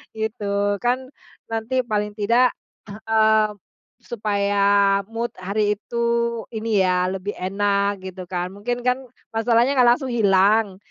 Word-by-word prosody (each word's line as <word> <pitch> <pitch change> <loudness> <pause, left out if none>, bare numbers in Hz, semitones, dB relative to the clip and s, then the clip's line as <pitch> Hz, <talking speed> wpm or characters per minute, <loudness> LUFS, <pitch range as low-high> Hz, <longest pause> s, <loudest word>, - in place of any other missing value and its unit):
gitu. 205 -2 -1
Kan 255 +3 -1 0.4
nanti 225 +3 -1
paling 210 -3 -2
tidak, 235 +4 +3 0.3
eee, 220 0 +2 0.5
supaya 205 -4 -1 0.5
mood 230 +1 -4
hari 205 +3 -1
itu 215 +3 -9 0.6
ini 220 -1 0
ya 180 0 +1
lebih 195 +2 -4
enak 200 +1 0
gitu 185 0 -8
kan, 180 0 -3
mungkin 240 +4 -3
kan, 250 +1 +1 0.3
masalahnya 235 +3 +3
enggak 250 -2 +5
langsung 265 -3 -5
hilang, 200 -1 +3
215 Hz, 120 wpm, -22 LUFS, 200-235 Hz, 0.6 s, enggak